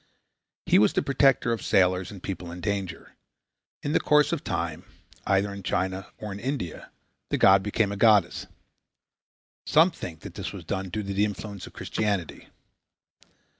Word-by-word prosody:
He - - +5
was 105 - +4
the - - +1
protector 135 -3 +3
of 115 - -1
sailors 90 -1 +2
and 100 -3 -11
people 90 -3 -5
in 90 - -8
danger. 100 -1 -4 0.7
In 145 - -1
the - - +4
course 150 0 +3
of 170 -4 -2
time, - - -3 0.4
either 100 +1 +2
in 100 - -7
China 95 0 -2
or 105 - -6
in 100 - -6
India, 125 - -4 0.4
the - - 0
god 95 0 +6
became 105 +1 0
a 100 - -4
goddess. 105 -4 +3 1.2
Some 160 +4 +5
think 80 - -8
that - - -9
this - - -5
was - - -9
due 95 0 -3
to 105 +4 -3
the 100 +1 0
influence 105 -1 -4
of - - -14
Christianity. 100 -6 -3
100 Hz, 165 wpm, -26 LUFS, 95-110 Hz, 1.2 s, god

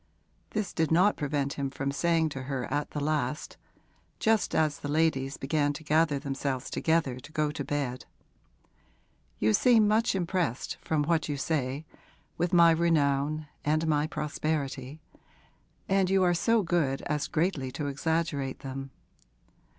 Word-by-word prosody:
This 210 -2 -3
did 160 -2 +1
not 180 +6 +4
prevent 140 -1 -1
him 140 -1 -1
from 135 0 -3
saying 165 +2 +1
to 135 -2 -6
her 130 -3 -2
at 145 0 -1
the 150 - -4
last, 150 0 -2 0.6
just 220 -1 +2
as 155 -2 +1
the - - -5
ladies 145 -3 +1
began 145 +1 0
to 160 - -9
gather 155 -1 +2
themselves 135 -2 -3
together 160 -6 +1
to 145 - -13
go 155 -1 0
to 150 - -4
bed: 135 -3 -3 1.3
'You 110 +1 +2
seem 225 - +5
much 215 0 +2
impressed, 175 -8 -1
from 155 -2 -1
what 160 0 0
you 145 - -1
say, 140 0 -2 0.5
with 175 +1 -1
my 170 -2 +7
renown 155 -2 +1 0.2
and 155 +2 +1
my 150 -1 +1
prosperity, 150 -2 -3 0.9
and 190 -1 +2
you 190 0 +3
are 175 -1 +4
so 225 +5 +2
good 160 -6 0
as 150 -1 -1
greatly 155 -6 -1
to 150 - -3
exaggerate 145 -1 -1
them. 135 -1 -6
150 Hz, 150 wpm, -28 LUFS, 140-165 Hz, 1.3 s, my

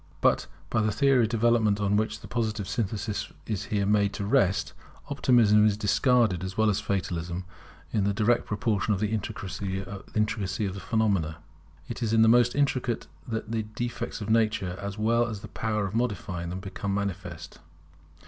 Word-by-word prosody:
But - - +2 0.2
by 110 - +2
the 105 0 +1
theory 130 +4 +4
of - - -3
development 115 -3 +2
on 100 0 +1
which 110 +1 0
the - - -10
Positive 110 -4 -2
synthesis 105 +1 -2
is 105 -5 -3
here 100 -2 0
made 100 0 +2
to 100 - -3
rest, 100 -6 +2 0.4
Optimism 115 -6 +5
is 105 -1 +1
discarded 110 - +2
as 95 0 -5
well 110 -1 +4
as 95 - 0
Fatalism, 90 -2 -3 0.5
in 105 - +2
the 100 - +2
direct 110 +4 +2
proportion 105 -2 0
of - - -5
the 105 0 0
intricacy 100 -2 -3
of 100 0 -2
the 100 - -6
phenomena. 95 -9 0 0.5
It 120 - -6
is 115 -1 0
in 110 0 +6
the - - +5
most 120 +1 +5
intricate 130 -4 0 0.2
that 110 -1 -4
the 115 -1 0
defects 115 +2 -4
of 105 - -4
Nature, 110 -5 +1
as 100 0 -5
well 115 +2 +2
as 110 -3 -5
the - - -8
power 105 -2 -1
of 100 - -5
modifying 100 -7 -2
them, 90 +2 -5
become 100 0 -3
most - - +1
manifest. 90 -4 -7
105 Hz, 180 wpm, -27 LUFS, 100-115 Hz, 0.5 s, in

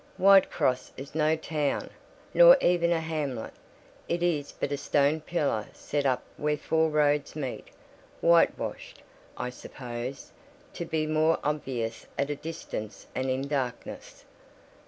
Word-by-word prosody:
Whitcross 190 -9 +4
is 135 +2 -8
no 155 0 +2
town, 155 -2 -2 0.4
nor - - +9
even 175 -1 +3
a 170 - +2
hamlet; 150 -7 -3 0.6
it 170 0 0
is 155 -5 0
but 145 - -4
a 145 - 0
stone 145 +2 +2
pillar 145 -10 -1
set 145 -1 -2
up 130 -1 +1
where 150 0 0
four 160 +2 +1
roads 150 -1 +1
meet: 135 -5 -5 0.5
whitewashed, 170 0 +1 0.3
I 125 - -3
suppose, 125 0 -7 0.4
to 170 - -5
be 160 -2 -1
more 155 +1 +2
obvious 130 -6 -3
at 140 +1 0
a - - -1
distance 140 -10 -7
and 130 +1 -1
in 130 +2 -1
darkness. 130 -5 -4
150 Hz, 135 wpm, -28 LUFS, 135-160 Hz, 0.6 s, nor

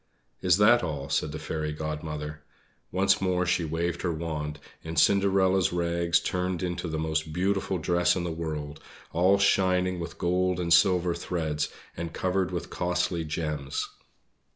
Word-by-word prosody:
"Is 90 -1 +4
that 110 +4 +6
all?" 75 -5 -4
said 75 - 0
the 80 - -5
Fairy 80 0 -3
Godmother. 75 0 -5 0.5
Once 95 +2 +2
more 90 -1 +1
she 90 -1 +1
waved 85 +2 -2
her 90 - 0
wand, 75 -2 -4 0.3
and 80 0 -6
Cinderella's 95 +1 +4
rags 85 -1 +1
turned 90 -1 -2
into 90 0 -2
the 80 -1 -3
most 80 0 -1
beautiful 95 +2 0
dress 85 +1 +2
in 90 - -2
the 85 - -2
world, 75 -2 -5 0.3
all 95 +4 +4
shining 90 -2 +2
with 85 0 -6
gold 90 +1 +1
and 85 -1 +2
silver 90 0 +4
threads 80 -3 -2 0.2
and 85 0 -5
covered 95 0 0
with 90 -2 -5
costly 90 -1 -1
gems. 75 -3 -3
85 Hz, 155 wpm, -27 LUFS, 80-90 Hz, 0.5 s, that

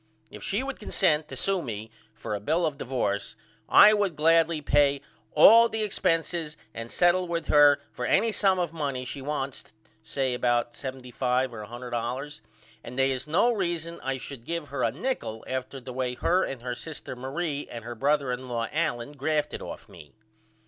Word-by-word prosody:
If 105 - -10
she 205 - -1
would 275 0 -5
consent 160 -7 +1
to 135 - -8
sew 195 +7 0
me 110 -5 -6 0.2
for 110 -1 -6
a 105 - -2
bill 160 - +1
of 155 -3 -1
divorce 115 -5 -2 0.3
I 215 - +9
would 200 -5 +1
gladly 165 +1 +3
pay 145 -1 +3 0.3
all 230 +9 +8
the 220 -1 -1
expenses 165 -5 -1 0.2
and 115 0 -6
settle 180 +4 +3
with 170 -1 -3
her 145 -1 +6
for 125 - -4
any 225 +1 +3
sum 195 -3 +2
of 175 -3 -1
money 140 -5 -3
she 135 +2 -6
wants 140 -1 -3 0.4
say 125 +4 -1
about 120 -1 +1
$75.00 130 0 -2
or 105 -2 -7
$100.00 120 +4 -5 0.4
and 125 - -9
they 135 0 +3
is 130 +2 -3
no 190 +10 +3
reason 170 -4 -2
I 135 0 -2
should 130 -2 -8
give 170 +1 -4
her 140 -2 -3
a 115 - +2
nichol 140 - -3
after 130 +1 -4
the 130 0 -9
way 125 -1 -2
her 180 +8 +2
and 130 -3 -5
her 125 -1 -2
sister 150 0 -7
Marie 140 +4 -3
and 115 -2 -7
her 120 - -5
brother 140 +2 +1
in 130 +1 -6
law 115 -1 -1
Allen 145 -5 -1
grafted 150 +1 -1
off - - -7
of - - -26
me. 75 - -14
140 Hz, 185 wpm, -27 LUFS, 125-165 Hz, 0.4 s, I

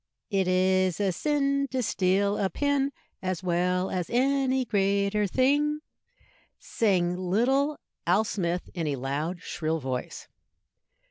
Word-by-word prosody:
"It 195 -2 +1
is 185 0 +2
a 200 -2 +2
sin 280 - 0
to 260 -2 -1
steal 200 -2 +1
a 195 - +1
pin, 280 - 0 0.3
As 185 -1 -3
well 180 +1 0
as 180 -2 -2
any 265 +1 +2
greater 200 0 +1
thing," 290 +7 +2 0.8
sang 180 -5 +1
little 245 +11 +1 0.3
Al 185 +5 +4
Smith, 180 -4 -2
in 165 -4 -2
a 145 - 0
loud, 145 +7 -3
shrill 160 -1 -2
voice. 130 -3 -5
195 Hz, 125 wpm, -27 LUFS, 180-260 Hz, 0.8 s, Al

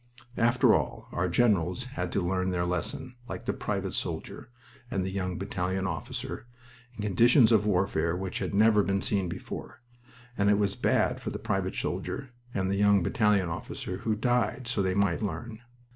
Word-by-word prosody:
After 120 +2 +5
all, - - -1
our 90 +1 0
generals 100 0 +2
had 90 -5 -3
to 95 - 0
learn 95 0 0
their 90 -1 0
lesson, 90 +7 -3 0.2
like - - -6
the - - 0
private - - -3
soldier, - - -4 0.4
and 95 -6 -1
the 95 - -3
young 95 -2 -2
battalion 95 0 -2
officer, 90 +6 -4 0.5
in 105 - -5
conditions 115 - +5
of 105 -2 +4
warfare 90 -4 +1
which 95 -1 -3
had - - -2
never 105 0 +5
been 100 -1 0
seen 95 -4 0
before 85 - -7 0.5
and 100 -2 +2
it 105 - +5
was 100 -1 +1
bad - - +1
for - - -3
the - - -4
private - - -2
soldier 135 -2 -3 0.2
and 95 -3 -1
the 100 - 0
young 100 -2 +4
battalion 105 -1 +2
officer, 90 +2 -5
who 110 +1 -1
died 125 +2 0
so 115 -3 0
they 95 -1 0
might 100 -3 +2
learn. 110 +2 -4
100 Hz, 175 wpm, -28 LUFS, 90-110 Hz, 0.5 s, After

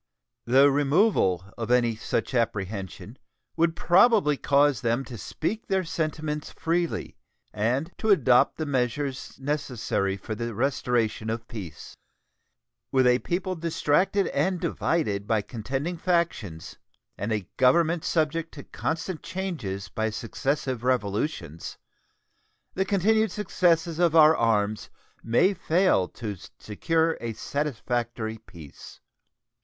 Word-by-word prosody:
The 135 +4 +5
removal 140 - +2
of 115 -1 -3
any 120 -2 +3
such 110 +3 -2
apprehension 100 -6 -3 0.4
would 165 0 +2
probably 185 -3 +4
cause 140 -3 +2
them 120 +3 0
to 125 - -8
speak 185 - -4
their 190 -1 +1
sentiments 155 -2 -3
freely 170 +1 -2 0.4
and 125 +10 0
to 220 - -1
adopt 130 - +4
the 155 - -2
measures 135 0 -2
necessary 125 -9 -2
for 105 +3 -6
the 115 0 -4
restoration 120 -3 0
of 115 +1 -4
peace. 100 -9 -9 1.0
With 130 -1 +3
a 125 0 +4
people 185 +4 -2
distracted 170 +4 +1
and 185 -1 0
divided 105 -17 -1
by 110 -2 +1
contending 135 - -4
factions 165 - -2 0.4
and 105 +3 -4
a 105 -5 -2
Government 160 +5 +3
subject 165 0 0
to 140 - -8
constant 165 +1 -4
changes 160 - -4
by 110 0 -2
successive 130 +3 -2
revolutions, 105 - -2 1.0
the 190 - 0
continued 215 +3 +2
successes 170 -4 +1
of 170 -2 +3
our 155 0 +7
arms 105 -3 0 0.3
may 120 - +3
fail 175 - +2
to 105 -5 -6 0.2
secure 160 +9 0
a 115 -1 -3
satisfactory 120 -4 -3
peace. 85 -9 -13
135 Hz, 115 wpm, -26 LUFS, 110-165 Hz, 1.0 s, our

